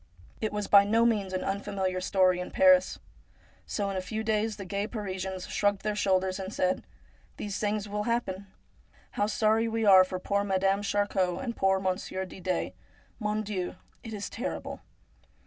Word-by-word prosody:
It 220 Hz, -, -1 dB
was 210 Hz, -1 st, -2 dB
by 200 Hz, 0 st, +7 dB
no 225 Hz, +3 st, +3 dB
means 210 Hz, -5 st, +1 dB
an 185 Hz, -, -2 dB
un 195 Hz, +1 st, -1 dB
familiar 190 Hz, -2 st, -2 dB
story 185 Hz, -1 st, +3 dB
in 180 Hz, -, -4 dB
Paris. 275 Hz, -1 st, +5 dB, 0.7 s
So 200 Hz, -2 st, -2 dB
in 195 Hz, -, -3 dB
a -, -, -1 dB
few 220 Hz, +4 st, -4 dB
days 220 Hz, 0 st, 0 dB
the 195 Hz, -, -7 dB
gay 200 Hz, +3 st, -2 dB
Parisians 190 Hz, -4 st, -4 dB
shrugged 205 Hz, -1 st, 0 dB
their 210 Hz, 0 st, -1 dB
shoulders 190 Hz, -2 st, +1 dB
and 190 Hz, 0 st, -5 dB
said: 185 Hz, -3 st, 0 dB, 0.3 s
' -, -, -32 dB
These 205 Hz, -1 st, -4 dB
things 210 Hz, 0 st, -1 dB
will 210 Hz, +1 st, -3 dB
happen. 200 Hz, -5 st, -2 dB, 0.6 s
How 205 Hz, -, 0 dB
sorry 220 Hz, +1 st, +2 dB
we 225 Hz, 0 st, -1 dB
are 190 Hz, -2 st, +9 dB
for 185 Hz, 0 st, -4 dB
poor 200 Hz, +2 st, 0 dB
Madame 195 Hz, 0 st, +1 dB
Charcot 200 Hz, -3 st, 0 dB
and 235 Hz, -3 st, -3 dB
poor 190 Hz, 0 st, +2 dB
Mon 185 Hz, 0 st, 0 dB
sieur 190 Hz, -2 st, -4 dB
Didet! 185 Hz, 0 st, -3 dB, 0.5 s
Mon 210 Hz, -1 st, -1 dB
Dieu! 190 Hz, -4 st, -3 dB, 0.3 s
it 225 Hz, -, -7 dB
is 205 Hz, -2 st, -4 dB
terrible 245 Hz, +5 st, -5 dB
200 Hz, 180 wpm, -29 LUFS, 190-215 Hz, 0.7 s, are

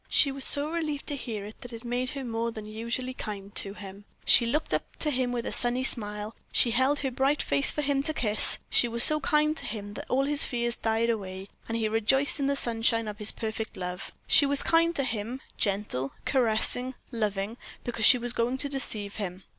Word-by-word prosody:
She 280 Hz, -, +5 dB
was 270 Hz, 0 st, +3 dB
so 290 Hz, +2 st, +4 dB
relieved 310 Hz, -4 st, -3 dB
to 290 Hz, -, -2 dB
hear 220 Hz, -6 st, -6 dB
it 210 Hz, -, -12 dB
that 245 Hz, -, -9 dB
it 230 Hz, +1 st, -9 dB
made 245 Hz, +1 st, -2 dB
her 275 Hz, -, -5 dB
more 230 Hz, -1 st, -3 dB
than 215 Hz, -2 st, -9 dB
usually 235 Hz, +4 st, -4 dB
kind 205 Hz, -4 st, -7 dB
to 195 Hz, 0 st, +1 dB
him. 200 Hz, 0 st, -11 dB, 0.2 s
She 235 Hz, -, +5 dB
looked 300 Hz, +7 st, -2 dB
up -, -, -3 dB
to 300 Hz, -, +2 dB
him 255 Hz, -2 st, 0 dB
with 240 Hz, -1 st, -3 dB
a -, -, -3 dB
sunny 245 Hz, +1 st, +4 dB
smile; 210 Hz, -3 st, 0 dB, 0.2 s
she 235 Hz, -, +3 dB
held 260 Hz, +5 st, +2 dB
her 270 Hz, -2 st, -2 dB
bright 270 Hz, +4 st, 0 dB
face 140 Hz, 0 st, +2 dB
for 300 Hz, -, 0 dB
him 275 Hz, -1 st, +1 dB
to 310 Hz, +3 st, -2 dB
kiss; 215 Hz, -6 st, +1 dB
she 240 Hz, -, +2 dB
was 235 Hz, 0 st, +5 dB
so 305 Hz, 0 st, +5 dB
kind 305 Hz, 0 st, +1 dB
to -, -, -3 dB
him 205 Hz, -1 st, -6 dB
that -, -, -9 dB
all 265 Hz, +2 st, +1 dB
his 290 Hz, 0 st, +1 dB
fears 235 Hz, -1 st, -1 dB
died 225 Hz, +1 st, 0 dB
away, 190 Hz, -3 st, -6 dB, 0.2 s
and 230 Hz, -, -3 dB
he 220 Hz, -1 st, 0 dB
rejoiced 225 Hz, +7 st, +2 dB
in 275 Hz, -, 0 dB
the 280 Hz, -, 0 dB
sunshine 230 Hz, -3 st, 0 dB
of 210 Hz, 0 st, -7 dB
his 210 Hz, 0 st, +5 dB
perfect 220 Hz, 0 st, -5 dB
love. 180 Hz, 0 st, -6 dB
She 290 Hz, -3 st, +6 dB
was 280 Hz, 0 st, +6 dB
kind 335 Hz, +1 st, +2 dB
to 275 Hz, -, 0 dB
him, 235 Hz, 0 st, -4 dB, 0.2 s
gentle, 195 Hz, -, -2 dB
caressing, 250 Hz, +1 st, 0 dB, 0.2 s
loving, 210 Hz, -1 st, -3 dB, 0.3 s
because 230 Hz, -3 st, -1 dB
she 255 Hz, -, +8 dB
was 240 Hz, 0 st, -4 dB
going 245 Hz, +2 st, -1 dB
to 285 Hz, +1 st, -4 dB
deceive 215 Hz, -7 st, -3 dB
him. 190 Hz, -2 st, -6 dB
235 Hz, 220 wpm, -27 LUFS, 215-270 Hz, 0.3 s, she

